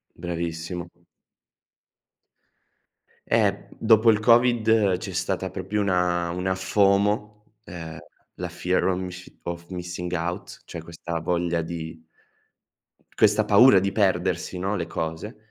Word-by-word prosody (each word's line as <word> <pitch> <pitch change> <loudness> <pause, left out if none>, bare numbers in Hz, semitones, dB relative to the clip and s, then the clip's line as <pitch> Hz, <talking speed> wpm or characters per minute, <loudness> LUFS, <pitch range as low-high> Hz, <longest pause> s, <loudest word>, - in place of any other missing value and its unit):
Bravissimo. 85 0 -4 2.4
Eh, - - +3
b - - -15
dopo 110 0 +5
il 105 - +1
COVID, 115 -4 +4
c'è - - -7
stata - - -2
proprio 105 +1 -3
una 90 -3 +1
una 95 +1 -1
FOMO, 105 +3 +1
ehm, 80 -4 -8 0.4
la - - -5
fear 90 +1 0
of 90 -1 0
misci 90 -1 -8
of 85 0 -6
missing 90 -1 -5
out 85 +2 -4
cioè 85 - -7
questa 85 0 -5
voglia 85 0 0
di 80 -1 -7 1.2
questa - - +4
paura 120 -6 +7
di 100 +1 -1
perdersi, 90 -3 0
no, 95 +3 -1
le 85 -4 -3
cose. 80 +8 -5
90 Hz, 120 wpm, -25 LUFS, 85-100 Hz, 2.4 s, paura